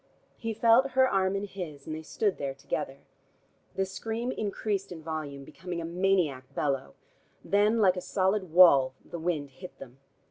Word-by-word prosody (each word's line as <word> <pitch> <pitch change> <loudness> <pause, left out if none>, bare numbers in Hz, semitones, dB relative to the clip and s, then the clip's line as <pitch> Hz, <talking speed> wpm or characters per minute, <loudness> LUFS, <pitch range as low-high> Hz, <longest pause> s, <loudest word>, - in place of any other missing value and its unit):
He 225 -1 -4
felt 235 +4 +4
her 260 0 +5
arm 190 -3 +1
in 195 - -2
his, 170 -8 -8
and 155 - -4
they 160 - -6
stood 200 +5 -1
there 135 -1 -3
together. 135 0 -4 0.7
The 190 +1 +1
scream 225 +5 -4
increased 200 -2 -2
in 165 -3 -8
volume, 155 -3 -5
becoming 180 +4 -7
a 165 - -4
maniac 170 -6 +1
bellow. 135 - -1 0.5
Then, 205 +3 +3
like 190 -4 +4
a - - -2
solid 190 0 0
wall, 140 -7 +7
the 170 - -7
wind 160 -4 -2
hit 180 +7 -11
them. 130 +1 -12
180 Hz, 170 wpm, -29 LUFS, 150-200 Hz, 0.7 s, wall